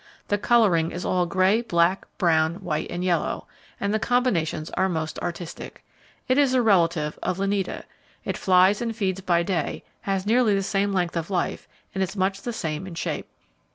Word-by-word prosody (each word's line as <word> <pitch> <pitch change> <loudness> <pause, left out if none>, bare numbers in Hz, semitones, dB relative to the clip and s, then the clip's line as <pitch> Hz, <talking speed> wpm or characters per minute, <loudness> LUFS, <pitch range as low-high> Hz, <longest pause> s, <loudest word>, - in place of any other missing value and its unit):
The 205 - +1
colouring 200 -8 +3
is 175 +1 -5
all 180 -1 +1
grey, 190 +5 +3
black, 175 -3 +1
brown, 160 -2 +2
white 175 -5 -3
and 175 +1 -3
yellow, 180 -2 0 0.3
and 200 +1 -1
the 215 - +2
combinations 190 -12 0
are 190 - +1
most 160 -3 -3
artistic. 170 -1 -6 0.4
It 255 +2 +3
is 270 -3 +3
a 255 - +4
relative 170 -7 +2
of 180 - -1
Lineata. 195 -1 -1 0.4
It - - -2
flies 185 +3 +4
and 230 -1 -2
feeds 195 -3 -1
by 170 -2 +2
day, 170 -4 -2 0.2
has 195 -1 -1
nearly 225 -1 +3
the 195 - 0
same 200 +1 0
length 180 -3 0
of 170 +1 -2
life, 180 -3 -2 0.3
and 190 - -2
is 190 +1 -2
much 195 +1 0
the 240 - -3
same 160 -4 -4
in 175 - -8
shape. - - -3
190 Hz, 185 wpm, -25 LUFS, 170-205 Hz, 0.4 s, a